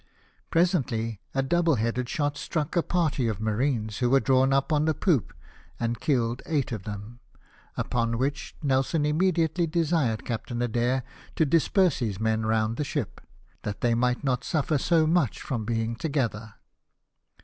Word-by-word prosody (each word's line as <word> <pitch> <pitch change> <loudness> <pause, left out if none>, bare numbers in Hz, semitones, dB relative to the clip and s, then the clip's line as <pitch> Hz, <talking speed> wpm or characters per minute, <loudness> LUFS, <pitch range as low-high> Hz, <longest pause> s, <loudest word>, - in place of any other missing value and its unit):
" - - -38
Presently 125 - +1
a 135 - +2
double 170 +2 +2
headed 115 +2 -1
shot 145 0 -1
struck 150 +1 -3
a 170 - +4
party 160 -8 0
of 110 -4 -2
marines, 110 -1 -1
who 125 - +2
were 135 +2 +5
drawn 130 0 +3
up 135 +3 +2
on 150 0 +2
the 160 -1 +1
poop, 160 - +1 0.5
and 115 -1 -1
killed 120 -3 0
eight 145 -6 0
of 105 -5 -5
them; 105 +3 -7 0.6
upon 115 -1 0
which 140 +3 -2
Nelson 140 +3 +1
immediately 165 +1 +1
desired 155 -8 0
Captain 120 0 -4
Adair 120 +2 0 0.3
to 160 - +3
disperse 170 +4 +3
his 105 -6 -2
men 110 0 0
round 110 0 +1
the 150 - 0
ship, 140 -5 -4 0.4
that 105 -1 -5
they 120 -1 +2
might 125 +2 +1
not 130 -3 0
suffer 155 -3 0
so 165 +2 +3
much 160 - +1
from 115 -5 -3
being 115 0 -1
together. 115 -6 -2
130 Hz, 160 wpm, -27 LUFS, 115-155 Hz, 0.6 s, were